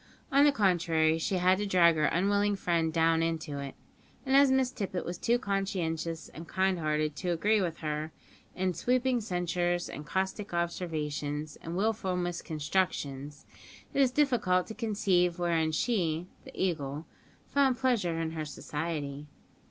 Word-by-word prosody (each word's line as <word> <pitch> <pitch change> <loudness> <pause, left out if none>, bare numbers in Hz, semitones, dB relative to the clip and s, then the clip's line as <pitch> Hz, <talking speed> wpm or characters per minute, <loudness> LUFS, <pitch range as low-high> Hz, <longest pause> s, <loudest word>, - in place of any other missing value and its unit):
On 280 +1 +6
the 295 - +6
contrary, 165 - +2
she 190 - -1
had 185 +1 +3
to 205 - -1
drag 175 -3 +5
her 155 -1 +2
unwilling 200 +4 +2
friend 170 -4 0
down 165 0 +3
into 160 -3 -2
it; 140 -1 -6 0.5
and 265 0 +2
as 275 -1 +6
Miss 265 -1 +2
Tippet 195 -7 -4
was 175 0 -5
too 240 +1 +2
conscientious 170 - -2
and 165 +1 -10
kind 190 0 +1
hearted 155 -1 0
to 180 - -3
agree 205 +5 +2
with 170 -3 -2
her 155 0 -3 0.4
in 185 0 0
her - - -2
sweeping 250 +6 +1
censures 175 -2 -1
and 150 - -7
caustic 190 +4 -2
observations 150 -4 -3
and 165 +2 -5
wilful 200 -3 0
misconstructions, 155 -4 -2 0.5
it 280 - +3
is 265 - +5
difficult 245 -10 +2
to 220 - -7
conceive 200 -6 +1
wherein 165 -2 +1
she 170 -3 0 0.2
(the - - -10
Eagle) 155 -4 -2 0.5
found 270 -3 +3
pleasure 210 -11 +1
in 165 -1 -2
her 160 -1 -4
society. 150 -1 -4
175 Hz, 155 wpm, -30 LUFS, 160-200 Hz, 0.5 s, On